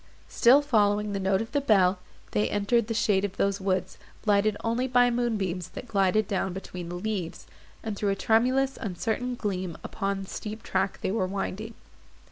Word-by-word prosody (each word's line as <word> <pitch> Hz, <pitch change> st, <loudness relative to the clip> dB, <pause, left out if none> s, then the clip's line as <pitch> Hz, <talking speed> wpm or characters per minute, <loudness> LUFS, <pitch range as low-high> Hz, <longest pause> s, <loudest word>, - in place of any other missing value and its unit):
Still 265 Hz, +4 st, +5 dB
following 210 Hz, -5 st, +2 dB
the 195 Hz, -, -1 dB
note 190 Hz, +2 st, +1 dB
of 225 Hz, -, -12 dB
the 285 Hz, -, +1 dB
bell, 195 Hz, -7 st, +3 dB, 0.3 s
they 105 Hz, +1 st, +1 dB
entered 210 Hz, +2 st, +1 dB
the 230 Hz, -, -1 dB
shade 205 Hz, -3 st, +2 dB
of 200 Hz, -2 st, -3 dB
those 200 Hz, 0 st, 0 dB
woods, 190 Hz, -1 st, -1 dB, 0.3 s
lighted 205 Hz, 0 st, +3 dB
only 230 Hz, +3 st, 0 dB
by 245 Hz, -1 st, +4 dB
the -, -, -1 dB
moonbeams, 195 Hz, -8 st, -1 dB
that 250 Hz, -, -7 dB
glided 200 Hz, -1 st, +2 dB
down 190 Hz, -2 st, -1 dB
between 180 Hz, -2 st, -7 dB
the 175 Hz, -, -5 dB
leaves, 185 Hz, -2 st, -4 dB, 0.4 s
and 220 Hz, -2 st, -3 dB
threw 205 Hz, 0 st, -1 dB
a 195 Hz, -, +1 dB
tremulous 255 Hz, +6 st, +2 dB
uncertain 225 Hz, +5 st, -2 dB
gleam 185 Hz, -6 st, -3 dB
upon 195 Hz, 0 st, -3 dB
the -, -, -10 dB
steep 215 Hz, +1 st, -6 dB
track 195 Hz, -, -1 dB
they -, -, -1 dB
were 195 Hz, -3 st, 0 dB
winding. 200 Hz, +3 st, -4 dB
205 Hz, 185 wpm, -27 LUFS, 190-230 Hz, 0.4 s, Still